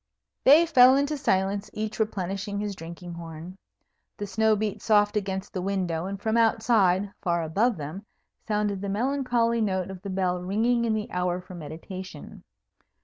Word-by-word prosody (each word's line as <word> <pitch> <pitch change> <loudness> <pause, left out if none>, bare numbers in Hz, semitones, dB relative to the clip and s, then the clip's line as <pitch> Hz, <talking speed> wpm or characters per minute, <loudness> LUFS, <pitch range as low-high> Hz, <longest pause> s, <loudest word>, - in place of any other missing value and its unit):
They 305 +5 +8
fell 260 -5 +7
into 285 +2 +1
silence, 195 -5 0
each 215 0 -4
replenishing 200 -1 -2
his 205 -1 -3
drinking 170 +1 -9
horn. 170 +2 -9 0.6
The 205 - -4
snow 220 +2 +2
beat 210 -1 -3
soft 205 -1 +3
against 190 -2 -3
the 185 - -2
window, 180 -3 -1
and 195 0 -5
from 220 +2 0
outside, 215 -4 +3
far 170 -3 0
above 205 +9 +1
them, 160 +8 -7 0.3
sounded 210 -2 -1
the 200 - -3
melancholy 235 0 +1
note 190 -3 -1
of 185 -2 -9
the 200 - -6
bell 185 -1 -1
ringing 230 +6 +1
in 220 -1 +1
the 215 -1 -4
hour 180 0 -1
for 180 0 -12
meditation. 175 +4 -9
200 Hz, 160 wpm, -26 LUFS, 180-220 Hz, 0.6 s, They